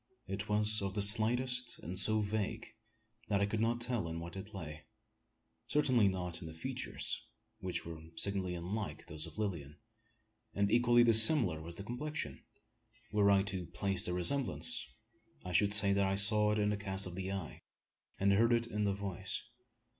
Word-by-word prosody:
It 100 +2 -6
was 105 0 +3
of 95 0 -5
the 105 - -1
slightest, 120 +4 +3
and 90 +3 -6
so 110 +3 +2
vague, 110 +2 -4 0.5
that 100 -2 0
I 100 - +1
could 105 +2 -4
not 115 +2 -1
tell 120 -6 -1
in 80 0 -6
what 85 +1 -9
it 95 +2 -9
lay. 80 -6 -9 0.8
Certainly 130 -8 +2
not 90 -2 -4
in 80 - -8
the 80 - -11
features 80 - -3 0.4
which 90 -2 -4
were 80 -1 -9
signally 95 -2 -2
unlike 100 +5 -6
those 75 0 -6
of - - -14
Lilian; 85 -9 -5 0.8
and 100 0 0
equally 120 0 +4
dissimilar 110 - +7
was 85 +1 -6
the 100 - -8
complexion. 120 - -6 0.7
Were 105 -1 +2
I 100 -1 +3
to 95 -4 -6
place 100 -1 -1
the 90 - -3
resemblance, 120 - +1 0.6
I 90 - -6
should 100 +4 +2
say 105 -1 +5
that 100 0 +1
I 95 - -1
saw 105 +1 +6
it 105 - -1
in 105 0 0
the 105 - -2
cast 100 -1 0
of 90 - -8
the 95 +1 -5
eye, 95 -5 -7 0.6
and 100 +1 +2
heard 115 +4 +2
it 115 0 +1
in 105 -3 -3
the 100 - 0
voice. 100 0 -4
100 Hz, 180 wpm, -33 LUFS, 90-110 Hz, 0.8 s, dissimilar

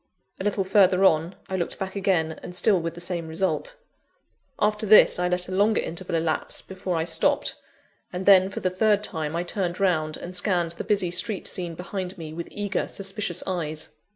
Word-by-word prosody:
A - - -4
little 205 -1 0
further 190 -1 +4
on, 165 +1 +3
I 190 - -3
looked 175 -2 -3
back 190 0 -5
again, 175 -5 0
and 180 - -8
still 195 -1 +3
with 165 0 -4
the - - -8
same 175 -2 -3
result. 180 - -2 0.8
After 210 +1 +1
this, 210 -3 +7
I 180 - +1
let 180 0 -1
a - - -7
longer 205 +3 +3
interval 170 +1 -3
elapse 160 -1 -1
before 185 -1 -4
I 160 0 0
stopped; 165 -1 +2 0.6
and 180 +1 -4
then, 190 -1 +7
for - - -6
the 185 - 0
third 210 +2 +2
time, 160 -4 -3
I 170 - -1
turned 180 0 -3
round, 155 -5 +1
and 180 +1 -8
scanned 175 -2 +1
the 170 - -6
busy 195 -4 +1
street 190 +3 -1
scene 175 -2 -2
behind 185 +1 -5
me, 160 -2 -7
with 170 +1 -6
eager, 205 -2 -2
suspicious 195 -2 -2
eyes. 155 -4 -3
180 Hz, 195 wpm, -25 LUFS, 170-195 Hz, 0.8 s, this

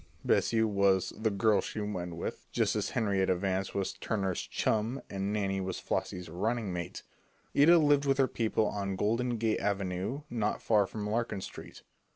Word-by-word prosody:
Bessie 110 -1 +3
was 100 -3 +2
"the 110 0 0
girl 105 +1 +3
she - - -5
went 90 -5 -3
with," 85 - -5
just - - +1
as - - -1
Henrietta 95 -5 +1
Vance 95 +1 -2
was 100 -1 -1
Turner's 95 -4 -2
"chum" 110 +5 -1
and 100 +1 -2
Nannie 95 -2 0
was 95 -1 -3
Flossie's 90 -1 -3
"running 105 +4 -1
mate." 85 0 -5 0.5
Ida 165 +5 +7
lived 145 -2 +4
with 135 -1 +2
her 135 -1 +4
people 110 -2 0
on 100 -2 -2
Golden 115 +5 0
Gate 110 -1 +1
Avenue 100 +5 -2
not 110 -5 -1
far 105 -3 +3
from 105 0 -5
Larkin 110 -2 -1
Street. - - -9
105 Hz, 170 wpm, -31 LUFS, 95-115 Hz, 0.5 s, Ida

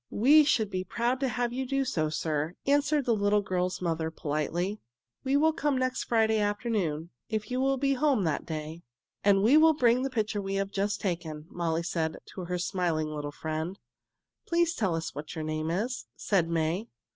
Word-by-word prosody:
"We 290 +8 +6
should 220 -7 +2
be 185 0 -2
proud 235 +7 -1
to 270 - +1
have 245 -1 -1
you 260 +1 -2
do 275 +1 0
so, 155 -10 0
sir," 155 +1 -2
answered 290 0 +2
the 235 - +3
little 205 0 +2
girl's 185 -1 -1
mother 160 -2 -1
politely. 160 +6 -2 0.4
"We 275 +1 +2
will 315 +2 +4
come 290 -3 0
next 255 0 -1
Friday 220 -2 +2
afternoon, 205 -7 -1 0.2
if 220 +2 -3
you 255 +1 0
will 270 0 +2
be 275 +1 +1
at 270 - 0
home 280 -9 +3
that 160 -4 0
day." 155 +1 -6 0.4
"And 200 -1 +4
we 255 +8 +6
will 320 0 +6
bring 245 -2 +3
the 270 - -1
picture 215 -4 -1
we 195 0 -3
have 195 0 -1
just 200 +1 -1
taken," 165 -5 -3
Molly 170 -1 -1
said 165 -2 -2 0.2
to 185 - -6
her 180 +1 -2
smiling 175 -4 -1
little 150 -1 -4
friend. 160 +5 -4 0.7
"Please 340 0 +2
tell 195 - 0
us 165 0 -4
what 145 +2 -7
your 160 - -3
name 155 0 -2
is," 220 +9 -2
said 180 -5 +1
May. 165 +6 0
195 Hz, 195 wpm, -29 LUFS, 165-250 Hz, 0.7 s, We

